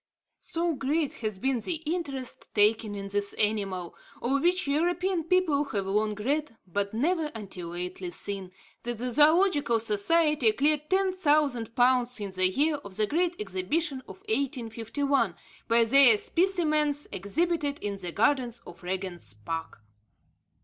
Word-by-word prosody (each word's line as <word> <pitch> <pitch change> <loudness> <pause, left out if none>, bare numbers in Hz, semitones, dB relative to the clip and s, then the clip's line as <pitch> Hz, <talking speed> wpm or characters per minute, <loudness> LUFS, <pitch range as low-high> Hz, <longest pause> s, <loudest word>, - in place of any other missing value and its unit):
So 335 0 -2
great 285 +2 -1
has 215 -3 -2
been 265 +4 0
the 335 - -2
interest 300 -5 -4
taken 210 0 +3
in 200 0 -6
this 200 0 0
animal, 195 -4 -1 0.3
of 275 +3 0
which 360 +3 +2
European 350 +4 0
people 330 -5 +2
have 205 -8 -3
long 210 +2 0
read, 275 +4 -2
but 200 +2 -2
never 315 +8 0
until 190 -5 -7
lately 180 +1 -5
seen, 190 +1 -5 0.3
that 240 -1 -4
the 250 +2 -2
Zoological 295 -2 +4
Society 235 +4 +2
cleared 300 +3 +1
10,000 300 - +1
pounds 250 -1 +3
in 200 -2 -4
the 185 0 +3
year 295 +9 +1
of 200 -9 -9
the 215 - +3
Great 345 +8 0
Exhibition 210 - -1
of 385 - -11
1851, 270 - -1 0.3
by 230 0 +4
their 245 -1 +6
specimens 305 - +1
exhibited 290 - -1
in 205 -5 -4
the 180 -2 -5
gardens 240 - +1
at 170 - -12
Regent's 180 - -4
Park. 160 0 -6
250 Hz, 140 wpm, -28 LUFS, 205-305 Hz, 0.3 s, their